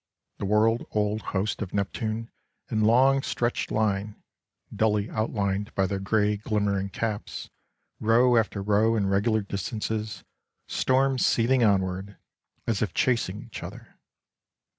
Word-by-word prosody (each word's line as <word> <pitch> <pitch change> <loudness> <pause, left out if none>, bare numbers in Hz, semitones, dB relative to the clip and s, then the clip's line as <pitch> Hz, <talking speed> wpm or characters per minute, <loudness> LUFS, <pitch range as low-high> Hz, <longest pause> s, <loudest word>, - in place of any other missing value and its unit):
The - - -2
world 110 +3 +2
old 105 0 0
hosts 100 +3 -2
of 95 -2 -4
Neptune 110 +3 -2 0.4
in 110 - +1
long 130 +5 +5
stretched 120 -2 -1
line, 105 -1 0 0.6
dully 105 -1 +1
outlined 105 -1 -1
by 95 - +2
their 95 +1 -2
grey 105 +1 +1
glimmering 100 -2 -1
caps, 110 +1 -4 0.5
row 120 +3 +4
after 105 -3 +1
row 105 +3 +3
in 105 -3 +1
regular 105 +3 +2
distances, 105 +2 -4 0.4
stormed 130 0 +2
seething 120 +2 +3
onward, 95 -1 0 0.5
as 110 -3 0
if 105 - -1
chasing 110 -5 0
each - - -9
other. - - -10
105 Hz, 125 wpm, -26 LUFS, 100-115 Hz, 0.6 s, long